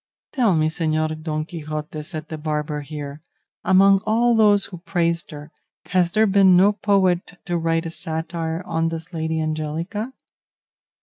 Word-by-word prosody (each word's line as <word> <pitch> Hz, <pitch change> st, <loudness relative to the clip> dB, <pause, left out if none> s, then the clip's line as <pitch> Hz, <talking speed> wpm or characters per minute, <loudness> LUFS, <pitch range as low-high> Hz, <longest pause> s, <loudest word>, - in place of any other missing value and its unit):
"Tell 230 Hz, -9 st, +2 dB
me, 155 Hz, 0 st, +2 dB
Señor 155 Hz, -1 st, -1 dB
Don 155 Hz, -1 st, -2 dB
Quixote," 155 Hz, -2 st, -6 dB
said 155 Hz, 0 st, -5 dB
the 155 Hz, -, -6 dB
barber 150 Hz, -1 st, -2 dB
here, 145 Hz, 0 st, -7 dB, 0.4 s
"among 195 Hz, +1 st, +5 dB
all 235 Hz, +3 st, +3 dB
those 210 Hz, -3 st, +4 dB
who 180 Hz, -4 st, -9 dB
praised 170 Hz, -1 st, -1 dB
her, 150 Hz, 0 st, -10 dB, 0.3 s
has 180 Hz, -2 st, +1 dB
there 220 Hz, +1 st, +4 dB
been 195 Hz, -2 st, +5 dB
no 200 Hz, +3 st, +5 dB
poet 190 Hz, -3 st, +1 dB
to 175 Hz, -, -2 dB
write 165 Hz, 0 st, 0 dB
a 165 Hz, -, -4 dB
satire 165 Hz, +1 st, -4 dB
on 165 Hz, -1 st, 0 dB
this 165 Hz, +2 st, -7 dB
Lady 160 Hz, 0 st, -2 dB
Angelica?" 160 Hz, -, -3 dB
165 Hz, 150 wpm, -22 LUFS, 155-190 Hz, 0.4 s, among